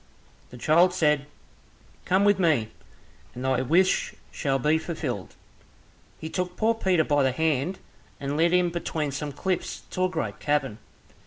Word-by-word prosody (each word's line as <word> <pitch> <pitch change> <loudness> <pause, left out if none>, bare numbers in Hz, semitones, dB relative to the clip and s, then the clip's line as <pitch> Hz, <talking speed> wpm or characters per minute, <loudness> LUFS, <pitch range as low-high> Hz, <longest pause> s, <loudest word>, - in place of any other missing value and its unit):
The 125 - -11
child 170 +7 +4
said, 150 -4 +2 0.8
"Come 190 +2 +3
with 205 -1 +4
me, 145 -11 +2 0.6
and 125 +2 -5
thy 130 -1 +2
wish 175 +8 +2 0.2
shall 135 -4 0
be 150 +4 +2
fulfilled." 145 - -5 0.8
He 160 - -6
took 180 +2 -3
poor 225 +1 +3
Peter 190 -7 +2
by 145 -1 +2
the 130 -1 +3
hand, 160 +5 0 0.4
and 140 0 -3
led 165 +2 +3
him 180 -1 +3
between 160 -3 -2
some 145 +1 -4
cliffs 185 +6 -3
to 185 - 0
a - - 0
great 110 - -4
cavern. 135 -7 -1
155 Hz, 155 wpm, -26 LUFS, 135-180 Hz, 0.8 s, child